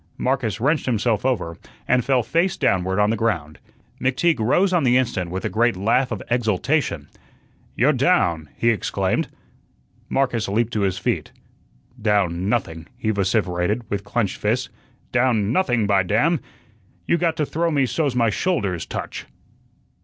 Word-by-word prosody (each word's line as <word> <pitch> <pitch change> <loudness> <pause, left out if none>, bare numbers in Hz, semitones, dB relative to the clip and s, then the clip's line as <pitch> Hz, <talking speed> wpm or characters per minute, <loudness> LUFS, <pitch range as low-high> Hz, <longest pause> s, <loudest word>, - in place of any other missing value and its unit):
Marcus 125 -5 -1
wrenched 150 +6 +1
himself 115 -3 +1
over 85 -10 -2 0.3
and 125 -1 +3
fell 130 -2 +2
face 175 - 0
downward 95 0 +1
on 105 +1 +3
the - - +1
ground. 90 -10 -2 0.4
McTeague 130 +4 +1
rose 180 - +2
on 175 -4 +3
the 125 -1 +4
instant 105 -9 -1
with 95 +2 -4
a - - +2
great 120 -2 +1
laugh 115 +7 +1
of - - -4
exultation. 120 - 0 0.7
"You're 140 +6 +3
down!" 90 - +1
he 115 - +2
exclaimed. 105 - -1 0.8
Marcus 125 -5 0
leaped 115 +4 0
to 105 - 0
his 95 -2 0
feet. 95 - -2 0.7
"Down 100 -4 +1
nothing," 80 -8 -2
he 110 -3 -1
vociferated, 100 +1 0
with 100 -1 -2
clenched 100 -1 -1
fists. 115 +5 -1 0.4
"Down 120 -4 +2
nothing, 120 - +2
by 100 -1 +3
damn! 120 - +2 0.7
You 170 - +2
got 165 -1 +1
to 155 -2 0
throw 165 +4 -1
me 140 -4 +2
so's 140 0 -1
my 115 -3 +2
shoulders 100 - -1
touch." - - -6
115 Hz, 155 wpm, -22 LUFS, 100-130 Hz, 0.8 s, the